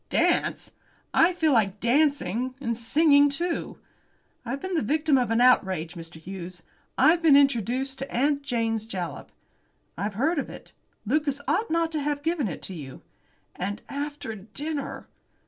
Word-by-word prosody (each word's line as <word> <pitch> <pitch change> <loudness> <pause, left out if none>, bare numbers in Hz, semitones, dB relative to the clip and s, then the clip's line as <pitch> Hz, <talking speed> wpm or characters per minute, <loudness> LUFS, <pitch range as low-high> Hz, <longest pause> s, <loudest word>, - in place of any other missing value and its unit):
"Dance! - - +1 0.4
I 335 - +5
feel 320 -4 +1
like 210 -5 +2
dancing; 255 -2 +1
and 235 -4 -2
singing, 285 +5 +4
too. 335 +5 -3 0.7
I've 250 +3 -4
been 375 +5 -5
the 330 - +1
victim 305 +5 +2
of 250 -3 +2
an 225 +1 +2
outrage, 190 -9 +3
Mr. 165 -2 -9
Hughes. 180 +1 -8 0.3
I've 335 +2 +5
been 310 -4 +7
introduced 265 0 +1
to 270 - -6
'Aunt 285 +3 +1
Jane's 225 -5 -1
Jalap.'" 180 -8 -5 0.6
"I've 200 +3 -3
heard 300 - +1
of - - -4
it. - - -12 0.3
Lucas 285 +3 0
ought 450 - +1
not 330 0 +1
to 310 -2 -2
have 290 0 -2
given 325 -6 0
it 170 - -6
you." 150 -8 -9 0.5
"And 205 +4 -4
after 290 -4 -4
dinner!" 275 +9 -6
265 Hz, 150 wpm, -26 LUFS, 215-295 Hz, 0.7 s, been